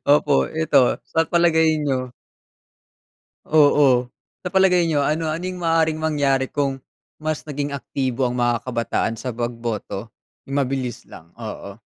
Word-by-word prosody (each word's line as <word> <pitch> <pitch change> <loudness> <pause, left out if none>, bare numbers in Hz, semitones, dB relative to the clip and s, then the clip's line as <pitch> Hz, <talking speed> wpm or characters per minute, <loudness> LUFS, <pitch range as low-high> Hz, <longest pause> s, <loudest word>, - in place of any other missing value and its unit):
opo 145 +1 +4 0.2
ito, 150 -5 +3
sa 165 0 +1
palagay 160 -2 +3
niyo? 130 -4 -2 1.4
Oo, 145 -5 +5 0.3
sa - - -5
palagay 180 -2 +3
niyo 145 -3 +1
ano-anong 165 +4 -2
maaaring 165 -2 +1
mangyari 140 -4 +1
kung 140 -1 -2 0.4
mas 155 0 -3
naging 145 -1 -4
aktibo 130 -2 -2
ang 125 0 -1
mga 120 -1 +1
kabataan 115 -2 -2
sa 125 -3 -5
pagboto? 115 -3 -4 0.4
Yung 140 +1 +1
mabilis 130 -2 -4
lang, 80 - -14
oo. 105 -3 -8
140 Hz, 125 wpm, -22 LUFS, 125-160 Hz, 1.4 s, Oo